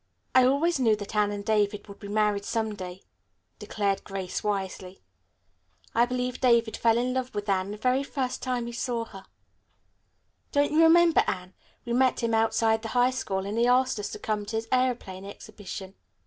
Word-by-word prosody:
"I 255 0 +6
always 285 +4 +2
knew 225 -4 +4
that 205 +1 -8
Anne 210 -1 +2
and 200 0 -5
David 210 -1 0
would 200 - -12
be 200 - -8
married 210 -1 +1
some 220 0 -2
day," 185 -2 -8 0.6
declared 200 -2 -1
Grace 195 -2 -5
wisely. 190 -2 -3 0.9
"I 235 +1 +3
believe 250 0 -3
David 235 -3 +3
fell 230 -1 +3
in 250 +1 0
love 255 -2 -3
with 205 0 -3
Anne 190 -1 0
the 210 - -6
very 255 +4 +1
first 270 -2 -3
time 250 -2 -2
he 235 - -5
saw 235 -1 -2
her. 195 -3 -12 1.3
Don't 285 0 +2
you 310 +2 +4
remember 335 0 +6
Anne, 185 0 -4 0.3
we 235 - -2
met 255 0 +2
him 230 -1 0
outside 225 0 +2
the 225 - -5
high 245 +1 +4
school, 195 -6 -3
and 210 +3 -2
he 240 - +3
asked 255 -1 +3
us 205 0 -4
to - - -6
come 210 -1 -2
to 225 - -4
his 225 +1 -2
aeroplane 245 -7 0
exhibition?" 200 -1 -9
225 Hz, 190 wpm, -27 LUFS, 205-250 Hz, 1.3 s, I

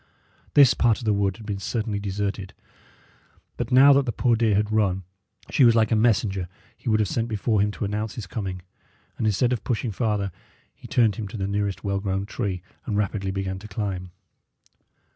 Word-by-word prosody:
This 140 -3 +8
part 115 -3 +2
of 120 - -8
the 105 - +3
wood 100 -1 0
had 110 - -11
been 100 -2 -3
certainly 110 0 -2
deserted, 100 -1 -3 1.0
but - - -4
now 135 +3 +8
that 140 -1 +2
the - - +1
poor 120 0 +2
deer 110 -2 +2
had 105 +1 +1
run, 95 -3 +1 0.5
she 140 - +4
was 115 -2 +6
like 110 -1 +3
a - - +4
messenger 105 -4 +1 0.3
he - - -30
should 110 0 +3
have 105 - +2
sent 115 +4 -1
before 110 -1 0
him 105 - +2
to 105 - -4
announce 105 +1 -3
his 110 - -5
coming; 95 -1 -5 0.6
and 110 - +1
instead 120 +4 +2
of 120 - -3
pushing 120 -1 -1
farther, 105 -3 -1 0.4
he - - -13
turned 115 -4 +2
him 110 -3 -4
to 105 - -7
the 95 - -2
nearest 100 0 -2
well 100 -1 -1
grown 95 0 -2
tree, 95 -3 -3 0.2
and 105 -3 -1
rapidly 100 -1 -1
began 95 0 -3
to 105 - -10
climb. 95 -3 -4
105 Hz, 200 wpm, -24 LUFS, 100-115 Hz, 1.0 s, This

